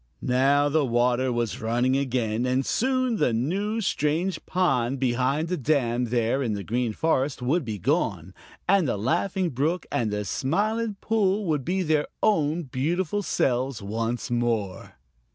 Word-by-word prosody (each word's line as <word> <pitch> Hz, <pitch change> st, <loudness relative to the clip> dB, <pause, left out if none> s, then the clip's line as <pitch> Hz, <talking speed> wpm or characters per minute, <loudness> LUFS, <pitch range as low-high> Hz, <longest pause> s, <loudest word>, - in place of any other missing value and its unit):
Now 135 Hz, +3 st, +3 dB
the 150 Hz, +1 st, +2 dB
water 125 Hz, +1 st, +1 dB
was 120 Hz, -2 st, -2 dB
running 120 Hz, +4 st, +1 dB
again, 120 Hz, -4 st, 0 dB
and 130 Hz, +1 st, +1 dB
soon 255 Hz, -1 st, +1 dB
the 125 Hz, -, +2 dB
new, 195 Hz, -, -1 dB
strange 165 Hz, -1 st, -1 dB
pond 135 Hz, -8 st, +1 dB
behind 130 Hz, +5 st, +1 dB
the 180 Hz, +1 st, -1 dB
dam 125 Hz, -4 st, +1 dB
there 120 Hz, +2 st, 0 dB
in 115 Hz, -5 st, -1 dB
the 100 Hz, -1 st, -4 dB
Green 120 Hz, +2 st, -1 dB
Forest 135 Hz, 0 st, 0 dB
would 150 Hz, +7 st, +1 dB
be 110 Hz, -4 st, -4 dB
gone, 100 Hz, -, -1 dB, 0.3 s
and 190 Hz, -4 st, +4 dB
the 110 Hz, -, -1 dB
Laughing 175 Hz, -, 0 dB
Brook 155 Hz, +8 st, -1 dB
and 115 Hz, -3 st, 0 dB
the 105 Hz, 0 st, -2 dB
Smiling 210 Hz, -, -1 dB
Pool 210 Hz, -2 st, +1 dB
would 150 Hz, -5 st, 0 dB
be 185 Hz, +6 st, 0 dB
their 155 Hz, -2 st, +1 dB, 0.2 s
own 165 Hz, -4 st, +2 dB
beautiful 165 Hz, +9 st, -1 dB
selves 130 Hz, -, 0 dB
once 115 Hz, +4 st, -3 dB
more. 115 Hz, -6 st, -1 dB
135 Hz, 155 wpm, -25 LUFS, 120-175 Hz, 0.3 s, and